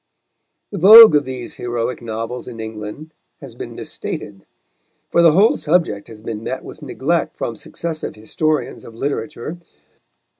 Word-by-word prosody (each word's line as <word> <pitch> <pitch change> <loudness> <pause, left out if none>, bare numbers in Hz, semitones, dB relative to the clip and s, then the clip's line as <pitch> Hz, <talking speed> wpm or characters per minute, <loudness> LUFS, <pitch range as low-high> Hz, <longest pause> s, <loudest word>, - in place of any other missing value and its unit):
The 200 - -4
vogue 220 +4 +10
of 145 - +2
these 130 -2 -7
heroic 120 0 -3
novels 115 +2 -5
in 120 -2 -9
England 110 +8 -8 0.3
has - - -11
been - - -8
misstated, 100 -2 -7 0.6
for 170 - +4
the 165 -2 +6
whole 200 +7 +4
subject 155 - 0
has 110 -2 -13
but 115 -1 -4
met 130 +4 -5
with - - -11
neglect 150 +4 -2
from 115 - -3
successive 160 +7 -6
historians 150 +8 -2
of 115 - -12
literature. 145 +4 -4
130 Hz, 145 wpm, -19 LUFS, 115-160 Hz, 0.6 s, vogue